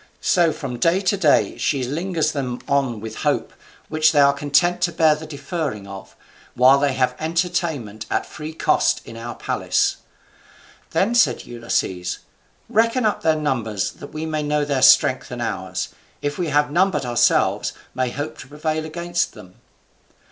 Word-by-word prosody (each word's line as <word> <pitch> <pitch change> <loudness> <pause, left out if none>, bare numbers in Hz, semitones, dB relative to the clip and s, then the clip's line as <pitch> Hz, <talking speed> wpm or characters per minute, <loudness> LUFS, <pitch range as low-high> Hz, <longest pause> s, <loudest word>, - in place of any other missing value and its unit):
So 175 -4 +4
from 125 -5 -6
day 170 +7 +3
to 195 +1 +1
day 165 -7 +2
she 140 -3 0
lingers 160 +3 -1
them 130 -5 -3
on 135 -6 0
with 110 0 -7
hope, - - -1 0.3
which 155 0 +3
they 145 - +4
are 140 0 +6
content 145 +5 +1
to 170 - +2
bear 160 -1 +4
the 155 +1 -7
deferring 145 - -4
of, 100 0 -10 0.4
while 130 +3 +6
they 140 -1 +1
have 125 -1 +1
entertainment 160 - -2
at - - 0
free 155 0 -8
cost 160 - +1
in - - -10
our 115 +1 -6
palace." - - 0 0.9
Then 210 +5 +1
said 160 - +3
Ulysses, 115 -6 -2 0.5
"Reckon 230 +2 +2
up 210 - +1
their 160 -1 +3
numbers 120 -10 -1
that 145 - -12
we 155 +1 -4
may 155 -1 -2
know 150 0 0
their 140 -2 0
strength - - +5
and - - -6
ours, - - -3 0.3
if 145 0 -3
we 175 - 0
having 145 0 +1
none 190 +4 +4
but 150 -8 -2
ourselves 120 -1 +2 0.2
may 130 -1 -1
hope 145 +5 -5
to - - -10
prevail 155 +2 -3
against 175 +2 -2
them." 90 0 -14
150 Hz, 170 wpm, -21 LUFS, 130-165 Hz, 0.9 s, are